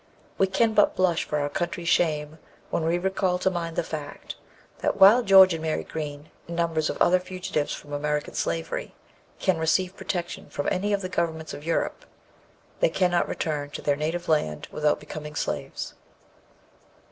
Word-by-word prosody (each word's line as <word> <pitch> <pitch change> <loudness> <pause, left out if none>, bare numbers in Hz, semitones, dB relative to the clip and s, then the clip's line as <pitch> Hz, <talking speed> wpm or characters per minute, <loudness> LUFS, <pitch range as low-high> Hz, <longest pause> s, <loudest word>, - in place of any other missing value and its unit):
We 195 - +4
can 220 +4 +2
but 210 -1 +4
blush 180 -3 +2
for 150 - -2
our 145 -1 0
country's 175 +3 -3
shame 155 -1 +1 0.3
when 165 - 0
we 165 +2 +2
recall 190 0 0
to 190 +1 +1
mind 170 -2 -3
the - - +1
fact, 150 -3 -6 0.5
that - - 0
while 210 +6 +8
George 190 -4 +7
and 160 - -4
Mary 160 -1 -1
Green, 150 -1 -6 0.2
and 170 - -5
numbers 165 -2 0
of - - -4
other 185 +1 +5
fugitives 180 -5 -3
from 145 - -7
American 150 0 -1
slavery, 165 0 -3 0.4
can 185 -4 +1
receive 180 +4 +1
protection 175 -3 -4
from 145 - -3
any 200 +3 0
of 200 -1 +1
the - - -1
governments 160 -3 -2
of 145 - -8
Europe, 165 - -1 0.8
they - - +4
cannot 180 -2 +1
return 145 -3 -2
to - - -7
their 145 - +2
native 160 +4 -3
land 115 - 0
without 150 0 +1
becoming 150 0 -8
slaves. - - -3
165 Hz, 170 wpm, -26 LUFS, 150-185 Hz, 0.8 s, while